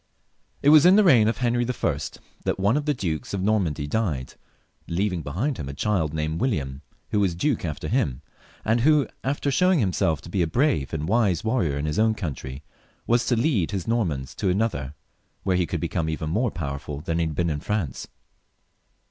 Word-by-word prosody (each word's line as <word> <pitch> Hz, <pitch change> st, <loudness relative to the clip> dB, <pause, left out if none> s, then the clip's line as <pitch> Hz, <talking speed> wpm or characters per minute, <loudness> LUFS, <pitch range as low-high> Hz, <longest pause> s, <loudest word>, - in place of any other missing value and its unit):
It 145 Hz, -, +6 dB
was 150 Hz, -1 st, +8 dB
in 180 Hz, +2 st, +7 dB
the 215 Hz, -, +6 dB
reign 120 Hz, -, +6 dB
of 115 Hz, -, 0 dB
Henry 120 Hz, -1 st, +1 dB
L 120 Hz, -, -1 dB, 0.5 s
that -, -, 0 dB
one 100 Hz, +5 st, +3 dB
of 145 Hz, 0 st, -1 dB
the 150 Hz, -, +3 dB
dukes 85 Hz, -4 st, -3 dB
of 95 Hz, -, -2 dB
Normandy 95 Hz, -9 st, +1 dB
died, 75 Hz, -, -2 dB, 0.5 s
leaving 90 Hz, 0 st, -1 dB
behind 100 Hz, -, -2 dB
him 70 Hz, -3 st, -5 dB
a 70 Hz, -, -6 dB
child 90 Hz, -4 st, 0 dB
named 80 Hz, +1 st, -2 dB
William, 70 Hz, -, -1 dB, 0.3 s
who 105 Hz, -, +2 dB
was 95 Hz, -4 st, +1 dB
duke 130 Hz, -, 0 dB
after 75 Hz, -4 st, -4 dB
him, 90 Hz, -, 0 dB, 0.4 s
and 115 Hz, +2 st, +2 dB
who, 150 Hz, +1 st, +4 dB, 0.2 s
after 140 Hz, +1 st, -1 dB
showing 180 Hz, +6 st, +3 dB
himself 90 Hz, -, +1 dB
to -, -, -11 dB
be 95 Hz, -, +1 dB
a 85 Hz, -, +2 dB
brave 120 Hz, -, +1 dB
and 80 Hz, -1 st, -3 dB
wise 100 Hz, -5 st, +2 dB
warrior 110 Hz, -, 0 dB
in 70 Hz, -, -2 dB
his 75 Hz, +4 st, -1 dB
own 110 Hz, 0 st, +3 dB
country, 70 Hz, -7 st, -5 dB, 0.4 s
was 120 Hz, 0 st, +2 dB
to 125 Hz, -, +3 dB
lead 115 Hz, -, +1 dB
his 95 Hz, -4 st, -4 dB
Normans 85 Hz, -, -1 dB
to 95 Hz, -, -1 dB
another, 90 Hz, -9 st, -1 dB, 0.5 s
where 95 Hz, -2 st, +1 dB
he 90 Hz, -2 st, +1 dB
would -, -, -1 dB
be -, -, -1 dB
come 80 Hz, -, -2 dB
evien 80 Hz, 0 st, -3 dB
more 110 Hz, +9 st, +1 dB
powerful 70 Hz, -4 st, -5 dB
than 80 Hz, +1 st, -2 dB
he 85 Hz, -, +1 dB
had 80 Hz, -, -5 dB
been 85 Hz, 0 st, 0 dB
in 75 Hz, -, -2 dB
France. 95 Hz, -, -3 dB
95 Hz, 205 wpm, -25 LUFS, 75-120 Hz, 0.5 s, was